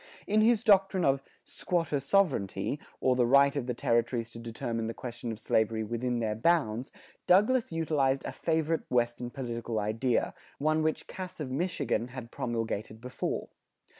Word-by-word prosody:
In 215 +1 +3
his 230 0 +4
doctrine 195 -4 +4
of 135 0 +3 0.2
"squatter 165 -5 -1
sovereignty," 140 - +1 0.2
or 130 -1 +3
the 125 -1 +3
right 140 +2 +5
of 135 -4 -2
the 125 - -2
territories 115 0 0
to 115 - -8
determine 115 0 -3
the 115 - -4
question 120 -1 -5
of 110 - -6
slavery 110 0 +1
within 120 +3 -2
their 110 -2 0
bounds, 125 -2 +1 0.4
Douglas 210 +6 +4
utilized 150 -5 +1
a - - -3
favorite 160 0 0
Western 120 0 0
political 120 -3 -4
idea, 110 +4 0 0.2
one 155 +2 +1
which 155 0 -1
Cass 185 -1 -7
of 140 -4 -4
Michigan 160 -5 -1
had 125 -2 -9
promulgated 115 -2 -3
before. 125 +2 -4
130 Hz, 155 wpm, -30 LUFS, 115-160 Hz, 0.4 s, right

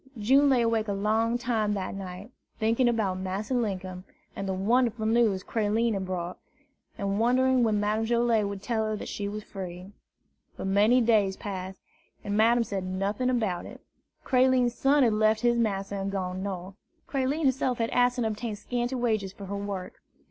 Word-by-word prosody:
June 270 +7 +4
lay 250 -3 +4
awake 225 -1 +1
a 200 - -1
long 220 +4 +1
time 225 -4 0
that 190 -2 -3
night, 195 +3 -8 0.3
thinking 230 +3 +2
about 205 -6 0
Massa 190 +6 -3
Linkum, 190 -6 -2 0.3
and 195 - -4
the - - 0
wonderful 230 +3 +1
news 220 -4 +2
Creline 225 +1 0
had 190 -2 -3
brought, 180 -1 -4 0.6
and 200 0 -1
wondering 255 +2 +3
when 215 -3 +2
Madame 210 +2 0
Joilet 235 -2 +2
would 200 0 -6
tell 220 0 0
her 215 0 -1
that - - -7
she 205 - -4
was 210 +1 -6
free. 185 -1 -8 0.7
But - - -5
many 210 +6 +4
days 210 -5 +2
passed, 190 -2 -6 0.4
and 205 - -2
Madame 230 +2 +4
said 200 -3 -4
nothing 195 +6 -1
about 215 -8 -1
it. - - -11 0.4
Creline's 255 -2 +3
son 275 +3 +3
had 230 -3 +3
left 215 0 +2
his 240 -1 +2
master 200 -3 -1
and 195 0 -3
gone 185 -1 -3
North. 190 -1 -5 0.3
Creline 275 +3 -1
herself 260 -2 +1
had 230 0 -1
asked 245 0 +3
and 240 - 0
obtained 220 0 -3
scanty 245 +3 -2
wages 220 -6 0
for 200 0 -10
her 200 +1 -5
work. 200 -2 -5
215 Hz, 180 wpm, -27 LUFS, 195-240 Hz, 0.7 s, June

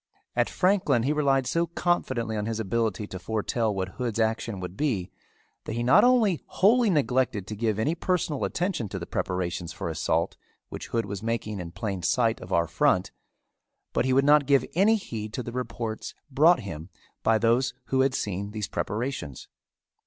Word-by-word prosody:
At - - +2
Franklin 185 - +2
he 140 +4 +1
relied 135 -3 +2
so 170 +6 +1
confidently 130 -10 -1
on 105 0 -2
his 115 -1 -2
ability 110 -1 -1
to 95 -2 -7
foretell 110 +3 -1
what 95 -2 -2
Hood's 120 -3 -2
action 110 -2 0
would 90 0 -6
be 105 -10 -1 0.5
that - - -4
he 120 +1 -1
not 125 +2 +6
only 225 - +4
wholly 225 +4 +4
neglected 130 - +1
to 105 - -6
give 110 -1 0
any 140 +9 +1
personal 170 -4 -1
attention 170 - -1
to - - -4
the - - -5
preparations 90 -1 -2
for - - -4
assault 85 +1 0 0.3
which - - -7
Hood 115 -2 -1
was 100 -1 -5
making 110 -2 -2
in 85 -2 -5
plain 95 +1 -4
sight 115 +3 +1
of 90 - -10
our 85 -2 +3
front 90 +2 +1 0.8
but - - +1
he 130 - +1
would 135 +2 +4
not 145 -1 +5
give 140 -3 +4
any 200 +6 +4
heed 110 - -5
to 125 - -3
the 120 - -6
reports 115 -3 -4 0.2
brought 155 +3 +5
him 85 -4 -7 0.3
by 110 0 +3
those 120 +3 +2
who 130 0 +3
had 135 0 +2
seen 100 0 -3
these 105 -1 -4
preparations. 105 - -4
115 Hz, 180 wpm, -27 LUFS, 100-140 Hz, 0.8 s, not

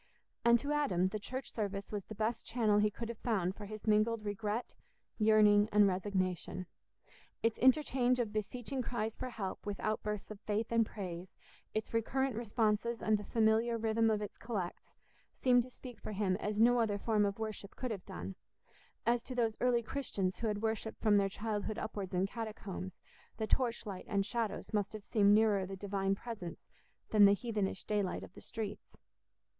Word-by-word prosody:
And 235 0 +7
to 285 +5 -3
Adam 260 -12 +2
the 215 - -3
church 260 +6 -5
service 200 -2 -3
was 205 -3 -3
the 215 - -8
best 220 +2 -1
channel 215 -4 +2
he 210 0 +4
could 230 +3 -6
have 235 -1 -6
found 190 -6 0
for 205 - -8
his 215 0 -8
mingled 215 +1 +3
regret, 210 +3 -2 0.5
yearning, 210 -1 +6
and 205 -1 +6
resignation; 185 -1 -1 0.8
its 230 -1 +1
interchange 255 -1 +4
of 225 -3 -1
beseeching 245 +5 -3
cries 225 -3 -2
for 255 - -4
help 200 -6 -5
with 205 -1 -4
outbursts 210 -1 -2
of 210 - -8
faith 215 +3 -2
and 230 -1 +3
praise, 180 -3 -6 0.4
its 215 +1 -2
recurrent 265 +3 +1
responses 225 0 0
and 215 -1 +2
the - - -6
familiar 225 +2 +2
rhythm 225 0 +2
of 210 -1 +1
its 205 - -8
collects, 205 -7 -4 0.4
seemed 245 -1 +4
to 250 - -8
speak 250 -3 -10
for 215 - -5
him 195 -2 +1
as 210 0 -2
no 240 +2 +6
other 215 -3 +1
form 210 0 +2
of 200 -1 0
worship 215 -2 -5
could 255 -2 -3
have 195 -4 -5
done; 90 +3 -6 0.7
as, 235 +1 +3
to 255 +1 -7
those 225 -3 +1
early 245 -1 +3
Christians 205 -8 -2
who 230 - -1
had 210 0 -2
worshipped 220 0 -2
from 210 -2 +4
their 200 -1 +3
childhood 210 +1 -3
upwards 195 -4 -4
in 180 +1 +3
catacombs, 200 -4 -5 0.4
the 220 - -1
torch 240 +1 +1
light 195 -3 -6
and 200 -1 +1
shadows 230 -2 -2
must 205 -1 0
have 215 -1 -7
seemed 205 -1 +5
nearer 210 -3 +3
the 195 - -5
Divine 195 0 0
presence 200 -6 -7 0.5
than 210 -2 +8
the 200 - +7
heathenish 210 -4 -2
daylight 205 -3 -1
of - - -11
the - - -12
streets. 215 -3 -6
215 Hz, 185 wpm, -34 LUFS, 200-230 Hz, 0.8 s, than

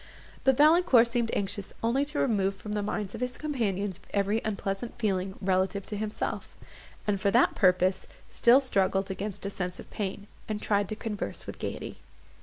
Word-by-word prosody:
But 265 -1 +4
Valancourt 305 -5 +6
seemed 235 -1 0
anxious 200 0 -3
only 240 +5 +2
to 295 +1 -5
remove 200 -7 +1
from 210 +2 -8
the 210 0 0
minds 205 -1 -3
of - - -7
his 250 0 -2
companions 205 - -2 0.2
every 200 +3 +1
unpleasant 200 +2 -3
feeling 195 -4 -1
relative 190 +1 0
to 210 - -4
himself; 210 +1 -4 0.5
and, 200 -2 0
for 200 - +3
that - - +4
purpose, 185 0 +3 0.2
still 245 +4 +5
struggled 195 -6 +1
against 200 +1 -4
a 200 - -2
sense 180 -2 -4
of - - -11
pain, 200 0 -4 0.2
and 215 -1 -2
tried 205 -2 +1
to 215 - -3
converse 210 -1 -4
with - - -8
gaiety. - - -5
205 Hz, 175 wpm, -28 LUFS, 195-230 Hz, 0.5 s, Valancourt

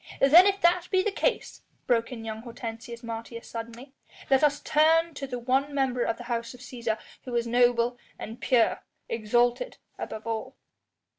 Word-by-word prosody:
"Then 330 +8 +8
if 395 0 +1
that 350 0 +3
be 375 -1 +2
the 425 - 0
case," 475 +4 -1 0.2
broke 230 -1 +1
in 225 -3 -7
young 220 0 -5
Hortensius 230 0 -8
Martius 230 0 -7
suddenly, 235 +4 -8 0.4
"let 270 +2 +5
us 290 -1 +3
turn 325 +2 +3
to 280 -1 -6
the 250 -2 -4
one 265 +4 0
member 260 -3 +1
of 230 -1 0
the 245 - -8
House 235 0 -3
of - - -15
Cæsar 235 -3 -3 0.3
who 250 -2 -5
is 235 0 +1
noble 240 0 +2 0.2
and 225 +3 -8
pure, 240 -3 +2 0.3
exalted 240 - +1 0.2
above 220 +1 -6
all." 225 -1 -4
245 Hz, 170 wpm, -27 LUFS, 230-280 Hz, 0.4 s, Then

